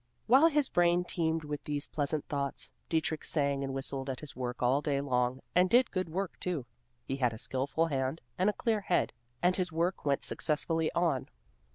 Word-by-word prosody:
While 270 +7 +7
his 295 -4 +2
brain 175 0 +3
teemed 165 -2 -1
with 150 -1 -5
these 145 0 -2
pleasant 145 0 -1
thoughts, 140 -1 -2 0.2
Dietrich 160 -1 0
sang 140 -2 +1
and 135 - -3
whistled 135 0 -3
at 130 - -3
his 150 - -8
work 125 -1 -4
all 130 +4 +3
day 145 -2 0
long, 125 -2 0
and 180 +1 +4
did 245 +4 +4
good 185 -3 -2
work, 190 +3 -3
too. 170 -9 -2 0.4
He 135 - -3
had 125 -4 +1
a - - -7
skilful 135 +7 0
hand 135 0 -1 0.2
and 185 +3 +2
a - - 0
clear 220 -2 0
head, 180 - +1 0.3
and 180 +1 +4
his 185 -2 -1
work 170 +3 0
went 140 -1 +1
successfully 160 +1 +1
on. 165 -7 +1
155 Hz, 195 wpm, -31 LUFS, 135-180 Hz, 0.4 s, While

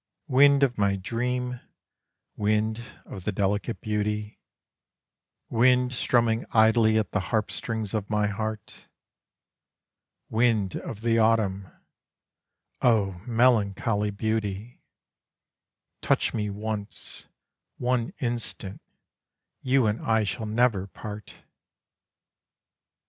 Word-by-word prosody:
Wind 140 0 +5
of 125 -5 +1
my 100 -1 +2
dream, 125 +5 -2 0.8
wind 110 +2 0 0.2
of 95 - -9
the 105 - -1
delicate 100 +4 -1
beauty, 105 0 -2 1.1
Wind 125 +2 +3
strumming 115 -2 +2
idly 110 0 +5
at 110 - 0
the 105 - +1
harp 110 -2 0
strings 110 -4 -4
of 105 -2 -2
my 105 -1 +1
heart: 110 0 -5 1.4
Wind 110 -4 +1
of 110 - -6
the 115 0 +2
autumn 105 -4 +2 1.1
O 100 -7 +2
melancholy 110 -3 +2
beauty, 105 +1 -3 1.2
Touch - - +1
me 105 -2 -1
once 105 +1 -5 0.5
one 125 -1 0
instant 120 -5 -3 0.8
you 130 -1 +3
and 105 +1 0
I 110 -1 +2
shall 110 +2 -3
never 110 -3 +1
part! 105 +1 -9
110 Hz, 95 wpm, -26 LUFS, 105-120 Hz, 1.4 s, Wind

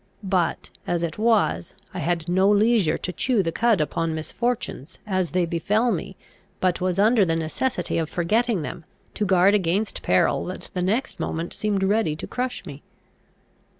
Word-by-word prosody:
But, 185 -3 -1 0.2
as 175 -1 0
it 170 +3 -3
was, 220 -5 +1 0.2
I 185 - -4
had 170 -1 -1
no 190 +3 +3
leisure 210 -5 +3
to 180 - -4
chew 240 -2 +1
the 165 - -1
cud 225 +1 +2
upon 160 +1 -1
misfortunes 185 - -3
as 185 -4 0
they 180 -1 +1
befel 205 +8 +1
me, 190 0 -4 0.4
but 180 -1 +1
was 185 0 0
under 215 +2 +4
the 165 -3 +1
necessity 165 - -1
of 160 -2 -2
forgetting 210 +2 +1
them, 165 - -6 0.3
to 210 - -1
guard 185 +1 +5
against 200 +2 0
peril 90 - +2
that 185 - -7
the 180 - -2
next 210 +7 -1
moment 165 +1 -3
seemed 205 -2 -1
ready 200 -5 +1
to - - -6
crush 250 0 -4
me. 140 +1 -9
185 Hz, 170 wpm, -24 LUFS, 170-215 Hz, 0.4 s, guard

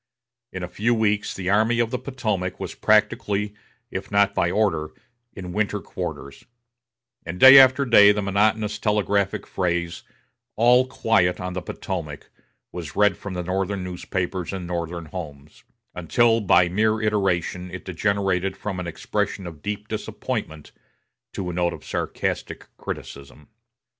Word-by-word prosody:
In 95 -1 -6
a - - -3
few 115 +6 0
weeks 105 -2 0
the 95 0 -2
Army 110 +3 +3
of 120 -1 +1
the 125 - -2
Potomac 105 -9 -3
was - - -5
practically, 105 0 +1 0.4
if - - -5
not 100 0 +3
by 85 - +1
order, 90 -6 0 0.5
in 90 -3 -7
winter 105 0 0
quarters; 70 -5 -7 0.8
and 85 +2 -6
day 130 +4 +11
after 130 +1 +6
day 105 -4 +7
the 105 0 -1
monotonous 105 +1 +1
telegraphic 105 -2 0
phrase 85 -2 -2 0.5
"All 125 +3 +4
quiet 110 -8 +1
on 90 0 -4
the 90 - -3
Potomac" 85 -5 -6 0.4
was 80 -5 -7
read 105 0 +4
from 100 - -7
Northern 95 +2 -2
newspapers 90 0 -4
in 95 -2 -5
Northern 85 -1 -4
homes, 75 -4 -9 0.3
until 115 +7 +2
by 90 -3 +4
mere 110 +4 +1
iteration 95 -4 -1
it 95 +1 -8
degenerated 95 0 -1
from 95 -3 -4
an 90 - -4
expression 100 +3 -3
of 80 -4 -9
deep 105 +3 -5
disappointment 80 -7 -5 0.6
to 95 - -4
a - - -7
note 85 0 0
of - - -11
sarcastic - - -4
criticism. 70 +1 -8
95 Hz, 145 wpm, -23 LUFS, 90-105 Hz, 0.8 s, day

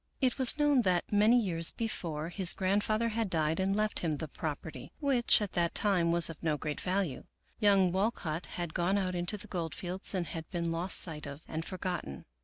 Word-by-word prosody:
It 260 +1 +1
was 260 +2 +3
known 295 -3 +3
that, 180 -5 +1
many 215 +4 +5
years 170 -6 +3
before, 165 -9 -3
his 180 -1 +4
grandfather 210 +4 0
had 225 -2 -2
died 160 -1 0
and 195 +1 +1
left 215 0 0
him 155 -4 -2
the 160 - -5
property, 155 +1 -6
which, 255 -6 +3
at 200 - -4
that 170 -1 0
time, 180 -5 +2
was 170 -1 +5
of 165 -3 -9
no 155 -2 0
great 150 0 -4
value. 185 -6 -2 0.3
Young 195 -4 +4
Walcott 185 -4 -2
had 175 -2 -5
gone 185 +3 +1
out 185 -2 -1
into 175 +4 -2
the 205 - -10
gold 170 -5 -4
fields 185 +2 -3
and 180 -2 -1
had 160 -1 -7
been 170 -2 -2
lost 170 +3 +4
sight 150 -3 0
of 140 +3 -9
and 160 +1 -4
forgotten. 180 - -5
180 Hz, 205 wpm, -31 LUFS, 165-205 Hz, 0.3 s, many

